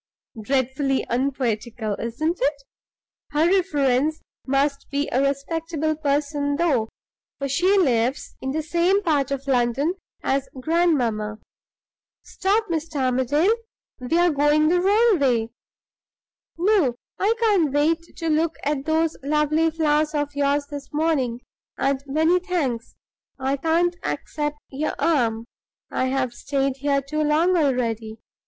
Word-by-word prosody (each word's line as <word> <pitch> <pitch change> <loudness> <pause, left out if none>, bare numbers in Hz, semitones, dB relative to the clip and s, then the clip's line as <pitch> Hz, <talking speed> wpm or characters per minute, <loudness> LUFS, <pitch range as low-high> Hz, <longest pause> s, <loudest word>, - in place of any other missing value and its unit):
Dreadfully 265 +3 0
unpoetical, 240 -4 -1
isn't 310 +10 -2
it? 280 +1 0 0.7
Her 300 +2 +3
reference 305 -6 +2 0.3
must 275 +1 0
be 285 +1 -1
a 260 - +2
respectable 310 +3 -1
person, 285 -1 0
though; 280 -9 +1 0.5
for 275 - -3
she 360 +9 +2
lives 255 -6 +1
in 265 - -3
the 310 +3 -2
same 350 +5 +2
part 290 -6 +1
of 275 0 -3
London 265 +4 +1 0.3
as 270 0 0
grandmamma. 250 -10 +1 0.9
Stop, 415 +4 0
Mr. 325 -1 -3
Armadale! 265 - +2 0.5
we 250 +6 0
are 350 0 +4
going 295 +1 +3
the 355 +1 +3
wrong 415 +1 +4
way. 240 -5 +2 1.1
No; 350 - +2 0.2
I 425 +4 +2
can't 400 -10 +3
wait 310 +4 +2 0.2
to 330 - -3
look 320 +1 +1
at 285 -1 -1
those 320 0 +1
lovely 300 +3 +2
flowers 310 -1 +1
of 290 -1 -1
yours 285 0 +1
this 285 -1 -7
morning, 295 -6 0 0.4
and, 275 0 0
many 320 +6 +3
thanks, 300 - -2 0.4
I 265 +1 0
can't 330 +4 +1
accept 295 -1 -3
your 285 +3 -2
arm. 230 -8 +1 0.5
I - - 0
have 260 -2 -1
stayed 275 +1 -1
here 280 0 0
too 305 +3 -2
long 315 +5 +3
already. 235 -7 0
290 Hz, 130 wpm, -23 LUFS, 265-325 Hz, 1.1 s, are